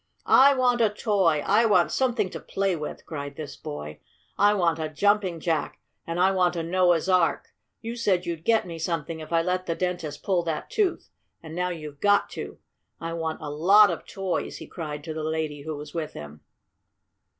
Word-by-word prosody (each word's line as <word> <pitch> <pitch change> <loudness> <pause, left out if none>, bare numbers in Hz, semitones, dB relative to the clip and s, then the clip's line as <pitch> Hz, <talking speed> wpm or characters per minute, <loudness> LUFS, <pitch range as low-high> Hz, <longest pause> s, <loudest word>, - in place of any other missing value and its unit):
"I 275 +1 +6
want 250 -2 +2
a 220 - +5
toy! 195 -8 +1
I 220 +3 +4
want 175 -7 +3
something 235 -7 0
to - - -6
play 195 -2 -1
with!" 150 -2 -6
cried 145 -2 -6
this 150 -1 -7
boy. 75 +1 -7 0.4
"I 205 +1 +4
want 170 -4 +1
a 155 -1 -2
Jumping 195 +1 +1
Jack 160 -2 -2 0.3
and 165 +1 -3
I 190 +2 +4
want 180 -2 +2
a 165 - -2
Noah's 175 0 +2
Ark! 180 -3 +2 0.3
You 230 +1 -5
said 195 -6 +1
you'd 170 -2 -4
get 225 +1 +3
me 165 -2 -7
something 165 -1 -3
if 155 - -9
I 165 -1 +3
let 185 +1 -1
the 165 - -1
dentist 175 -5 -3
pull 185 -3 +1
that 160 -2 -3
tooth, 410 -5 0 0.3
and 160 -1 -9
now 180 +1 -1
you've 155 -4 -7
got 205 0 +3
to! - - -7 0.4
I 165 0 -4
want 160 -1 -3
a 145 - -4
lot 195 +8 +6
of - - -6
toys!" 190 -3 -3
he - - -9
cried 150 -4 -6
to 160 - -5
the 155 0 -4
lady 155 -2 -2
who 155 +1 -5
was 150 +1 -9
with 160 -2 -4
him. 75 0 -10
170 Hz, 200 wpm, -26 LUFS, 155-195 Hz, 0.4 s, I